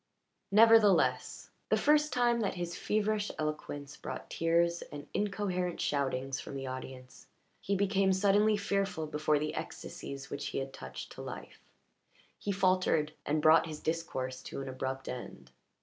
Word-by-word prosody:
Nevertheless, 220 -1 +4 0.2
the - - +4
first 300 0 +3
time 240 -1 +2
that 205 -4 -1
his 175 -1 -4
feverish 210 +1 0
eloquence 150 -2 -4
brought - - -7
tears 170 +1 +2
and 145 0 -8
incoherent 190 -4 -1
shoutings 135 -2 -1
from - - -7
the 135 0 -4
audience, 130 0 -8 0.3
he 200 - -1
became 195 0 +2
suddenly 205 +2 +4
fearful 195 -5 -1
before 150 0 +1
the 150 +1 -2
ecstasies 140 0 -7
which 140 0 -3
he - - -4
had 135 0 -3
touched 65 0 -8
to - - -9
life, - - -8 0.8
he 205 - -2
faltered, 185 -5 +2
and 150 +1 +1
brought 160 +1 +6
his 155 -1 -6
discourse 130 -6 -3
to - - -7
an 135 - -5
abrupt 130 +1 -4
end. 70 - -7
165 Hz, 150 wpm, -32 LUFS, 140-200 Hz, 0.8 s, brought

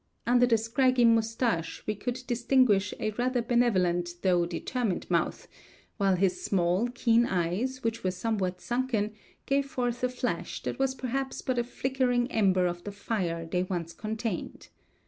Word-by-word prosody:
Under 245 +1 +4
the 230 -2 +4
scraggy 245 +2 +2
mustache 225 -6 +1
we 215 - 0
could 245 +5 -4
distinguish 240 -4 +3
a 215 - -1
rather 245 +3 0
benevolent 185 -8 +2
though 175 -2 +3
determined 200 +3 -2
mouth; - - 0 0.5
while 195 -3 +3
his 185 0 +1
small, 185 +4 +1
keen 240 -1 +2
eyes, 195 +10 -1
which 230 0 -2
were 185 - +2
somewhat 185 -1 -2
sunken, 240 -4 -1 0.3
gave 275 0 +1
forth 245 -2 -2
a 250 - +3
flash 250 - -3
that - - -4
was 270 -1 +1
perhaps 265 +1 -3
but 255 -2 0
a - - +2
flickering 250 0 0
ember 190 -4 +3
of 175 0 -2
the 205 - -5
fire 185 -5 -2
they 180 +2 -1
once 175 -3 -3
contained. 220 -2 -4
225 Hz, 155 wpm, -28 LUFS, 185-245 Hz, 0.5 s, Under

